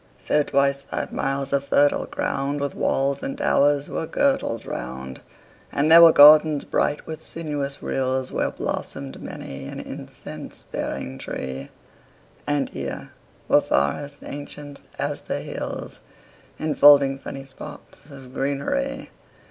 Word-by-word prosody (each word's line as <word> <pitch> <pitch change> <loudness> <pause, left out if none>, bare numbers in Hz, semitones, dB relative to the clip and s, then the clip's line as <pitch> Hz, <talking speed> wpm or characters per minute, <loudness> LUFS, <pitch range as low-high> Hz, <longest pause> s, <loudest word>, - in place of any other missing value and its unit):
5 - - -20
So 150 - +3
twice 140 -1 +1
five - - -5
miles 135 0 -2
of 140 0 +1
fertile 145 +1 +3
ground 140 +1 -2
With 140 0 -2
walls 140 +1 0
and 275 0 -4
towers 145 - +2
were 160 - -3
girdled 270 - 0
round: 65 +1 -6 0.5
And 150 +3 +1
there 165 +1 +10
were 165 -1 +10
gardens 150 0 +8
bright 145 - 0
with 160 -1 -7
sinuous 145 -4 -4
rills 130 0 -1
Where - - 0
blossom'd 70 -1 -5
many 70 0 -7
an - - -7
incense - - -9
bearing 65 +1 -4
tree; 65 +1 -5 0.8
And 145 -1 0
here - - -6 0.4
were - - +5
forests 140 - -1
ancient 145 0 -8 0.2
as - - -2
the - - -3
hills, - - -6 0.6
10 155 - -3
Enfolding 140 -2 +6
sunny 135 0 -7
spots 145 +2 -11
of 135 -2 -12
greenery. 135 - -2
140 Hz, 135 wpm, -23 LUFS, 135-145 Hz, 0.8 s, there